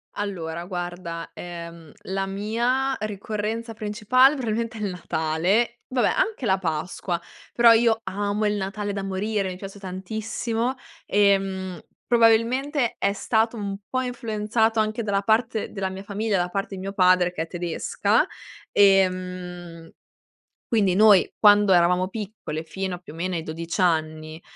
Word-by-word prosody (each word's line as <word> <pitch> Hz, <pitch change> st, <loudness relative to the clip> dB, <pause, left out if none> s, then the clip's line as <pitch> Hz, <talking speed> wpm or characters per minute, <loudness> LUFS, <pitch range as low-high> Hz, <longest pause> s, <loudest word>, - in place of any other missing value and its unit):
Allora, 170 Hz, -4 st, -4 dB
guarda, 175 Hz, -2 st, -5 dB
ehm, 170 Hz, -2 st, -9 dB
la 195 Hz, 0 st, -2 dB
mia 235 Hz, +7 st, 0 dB
ricorrenza 215 Hz, +2 st, -4 dB
principale 225 Hz, +6 st, +3 dB
probabilmente 230 Hz, -3 st, -2 dB
è -, -, -7 dB
il 205 Hz, -, -1 dB
Natale. 180 Hz, +8 st, 0 dB
Vabbè, 255 Hz, -1 st, +1 dB
anche 450 Hz, -, 0 dB
la 190 Hz, -3 st, +2 dB
Pasqua, 175 Hz, +1 st, -2 dB, 0.3 s
però 235 Hz, -1 st, +7 dB
io 225 Hz, 0 st, +4 dB
amo 205 Hz, +2 st, -1 dB
il 210 Hz, -, +2 dB
Natale 205 Hz, +1 st, -3 dB
da 200 Hz, -, -3 dB
morire. 195 Hz, +1 st, -1 dB
Mi 180 Hz, -, -6 dB
piace 195 Hz, +1 st, -9 dB
tantissimo 220 Hz, +6 st, -3 dB, 0.3 s
e, 200 Hz, -1 st, +4 dB
mhmm, 190 Hz, -2 st, -5 dB, 0.3 s
probabilmente 240 Hz, +4 st, +3 dB
è -, -, +2 dB
stato 225 Hz, +3 st, 0 dB
un 200 Hz, -2 st, -3 dB
po' 255 Hz, 0 st, 0 dB
influenzato 225 Hz, -2 st, 0 dB
anche 215 Hz, +2 st, 0 dB
dalla 200 Hz, -2 st, 0 dB
parte 220 Hz, +1 st, +1 dB
della 195 Hz, -2 st, -3 dB
mia 190 Hz, +1 st, -7 dB
famiglia, 205 Hz, +1 st, -1 dB
dalla 175 Hz, 0 st, 0 dB
parte 195 Hz, +1 st, -3 dB
di 185 Hz, -, -7 dB
mio 195 Hz, +1 st, -5 dB
padre, 180 Hz, -2 st, +4 dB
che 160 Hz, -, -3 dB
è -, -, -9 dB
tedesca 175 Hz, -1 st, 0 dB, 0.5 s
e, 195 Hz, -2 st, +6 dB
mhmm, 180 Hz, -2 st, -8 dB, 0.8 s
quindi 200 Hz, -6 st, +2 dB
noi, 205 Hz, -1 st, +6 dB
quando 205 Hz, -2 st, +6 dB
eravamo 180 Hz, +1 st, +4 dB
piccole, 195 Hz, -7 st, -6 dB
fino 190 Hz, +2 st, -4 dB
a -, -, -12 dB
più 175 Hz, -4 st, -13 dB
o -, -, -11 dB
meno 180 Hz, +2 st, -2 dB
ai 165 Hz, -, -2 dB
12 165 Hz, +3 st, -4 dB
anni, 155 Hz, -2 st, 0 dB
200 Hz, 150 wpm, -24 LUFS, 180-220 Hz, 0.8 s, però